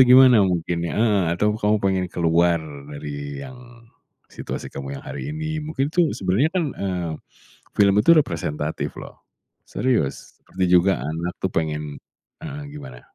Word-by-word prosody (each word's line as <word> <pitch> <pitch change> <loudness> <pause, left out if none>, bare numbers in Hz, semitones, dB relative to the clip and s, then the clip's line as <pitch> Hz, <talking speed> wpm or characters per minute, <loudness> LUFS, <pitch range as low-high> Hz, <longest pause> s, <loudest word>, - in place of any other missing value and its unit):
itu - - +12
gimana 125 -3 +8
mungkin 85 -2 -1
iya, - - -4
heeh, 105 -3 +3
atau 105 +3 +2
kamu 105 0 +2
pengen 95 -1 +1
keluar 85 0 +3 0.3
dari 70 -1 -6
yang 130 -1 -10 0.7
situasi - - -6
kamu 70 0 -6
yang - - -18
hari - - -5
ini, 155 0 -3
mungkin 150 -2 -2
itu 175 -2 +3
sebenarnya 100 +11 +2
kan, 180 - +2
eee, 90 -4 -2 0.6
film 100 -1 +5
itu 125 - +4
representatif 80 - -2
loh, - - -11 0.5
serius. 120 - -1
Seperti 95 0 -3
juga 90 -4 +4
anak 85 +4 -3
tuh, 95 - 0
pengen 75 -2 -2 0.4
heeh, 145 -2 -6
gimana? 65 - -10
95 Hz, 150 wpm, -23 LUFS, 80-125 Hz, 0.7 s, itu